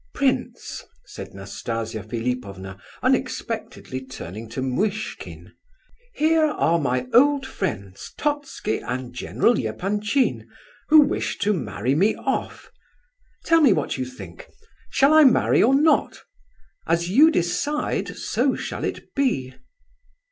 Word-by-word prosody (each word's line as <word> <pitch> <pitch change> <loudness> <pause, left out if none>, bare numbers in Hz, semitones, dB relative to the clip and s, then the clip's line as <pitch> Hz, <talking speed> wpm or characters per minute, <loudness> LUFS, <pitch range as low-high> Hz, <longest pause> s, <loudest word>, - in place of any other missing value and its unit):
"Prince," 275 -2 -1 0.2
said - - -10
Nastasia 110 +3 -5
Philipovna, 105 -4 -5 0.2
unexpectedly 130 0 -2
turning 110 -4 -8
to 130 +3 -4
Muishkin, 205 +12 -3 0.6
"here 315 +1 +3
are 170 - +1
my 125 -3 -1
old 280 +2 +5
friends, 100 - -5
Totski 290 - -2
and 125 0 -5
General 180 - +1
Epanchin, 205 - -1 0.4
who 310 0 +9
wish 285 - -1
to 210 +1 +1
marry 130 - -2
me 195 +9 +3
off. - - -4 0.7
Tell 330 -1 +4
me 270 -9 +6
what 140 - -2
you 130 - -1
think. 130 - -11 0.4
Shall 280 +2 +4
I 310 0 +8
marry 260 -4 +4
or 260 +5 +5
not? 305 +3 +2 0.6
As 170 +2 0
you 295 +10 +7
decide, 290 - -1
so - - 0
shall - - -5
it - - -5
be." 185 - 0
175 Hz, 120 wpm, -23 LUFS, -, 0.7 s, who